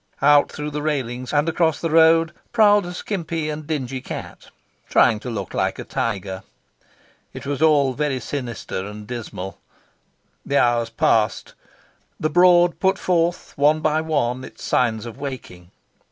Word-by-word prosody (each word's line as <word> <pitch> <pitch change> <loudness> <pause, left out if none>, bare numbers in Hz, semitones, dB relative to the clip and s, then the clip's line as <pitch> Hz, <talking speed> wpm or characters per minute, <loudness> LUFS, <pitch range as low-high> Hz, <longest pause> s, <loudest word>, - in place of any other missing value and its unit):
Out 145 0 +5
through 150 0 -5
the 150 0 -3
railings, 130 -5 -3
and 145 +1 +2
across 165 -1 +1
the 165 - -2
road, 165 0 +5 0.2
prowled 205 -4 +5
a 175 - -6
skimpy 165 -6 -3
and 150 0 -7
dingy 135 -4 -3
cat, - - -8 0.4
trying 110 -3 +4
to 125 - -7
look 100 -6 -5
like - - -1
a - - -6
tiger. 95 -4 -3 0.9
It - - -9
was 140 0 -3
all 145 -4 +4
very 140 -1 -1
sinister 120 -7 -5
and 105 0 -9
dismal. 105 -6 -7 0.8
The 140 - 0
hours 120 -1 +2
passed. 115 -1 +1 0.7
The 155 - -1
Broad 175 0 +5
put 190 0 +2
forth, 175 -1 0
one 150 +2 +3
by 155 0 +1
one, 130 -6 -1
its - - -11
signs 115 -3 0
of 120 +3 -9
waking. 125 -11 -7
145 Hz, 155 wpm, -22 LUFS, 120-160 Hz, 0.9 s, Out